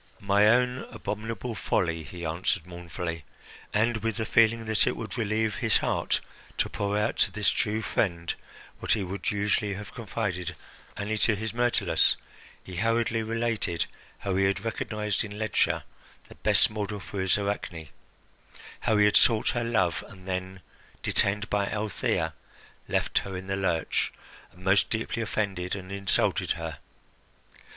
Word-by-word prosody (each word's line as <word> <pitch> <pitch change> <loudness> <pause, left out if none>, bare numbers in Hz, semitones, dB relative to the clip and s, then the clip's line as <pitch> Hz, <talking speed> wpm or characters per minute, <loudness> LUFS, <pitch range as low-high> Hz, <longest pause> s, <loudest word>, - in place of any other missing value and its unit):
"My 100 0 +4
own 125 +3 +3
abominable 115 +2 -4
folly," 85 -5 0
he 85 +2 -7
answered 85 +2 0
mournfully 85 -1 -5 0.5
and, 115 +2 +2
with 115 +1 -2
the 110 - -1
feeling 115 +1 +4
that 110 -1 +3
it - - +1
would 110 - -5
relieve 110 -2 0
his 115 -4 +3
heart - - 0 0.4
to - - +2
pour 100 0 -1
out 105 +2 0
to - - +3
this 105 -2 +2
true 110 0 0
friend 85 -7 0 0.5
what - - +2
he 105 - 0
would 95 0 -2
usually 105 0 +1
have 105 +2 -8
confided 100 -6 -3 0.4
only 105 +2 -1
to 110 - +4
his 110 +2 -3
Myrtilus, 120 0 +3 0.5
he 90 -2 -8
hurriedly 115 +2 +2
related 115 -6 0 0.3
how 95 -2 -2
he 95 - +4
had 100 +2 0
recognised 105 -2 -1
in 105 -1 -7
Ledscha 110 -2 +1 0.5
the - - -10
best - - +3
model 105 -1 -3
for 100 0 -5
his 95 +1 +3
Arachne, 100 -6 -3 0.9
how 110 - +2
he 105 - +6
had 105 - +4
sought 110 -2 +5
her 120 - 0
love, 95 -7 +1
and 95 -3 -14
then, 95 0 -3 0.4
detained 105 +2 +1
by 100 -1 +1
Althea, 105 -2 -1 0.5
left - - +2
her 95 -1 -5
in 95 - -7
the 95 0 -1
lurch 90 -4 0 0.4
and 90 - -16
most 95 +1 +4
deeply 115 +1 -1
offended 100 -5 -1
and 95 -1 -8
insulted 100 -1 +1
her. - - -5
105 Hz, 155 wpm, -28 LUFS, 95-110 Hz, 0.9 s, he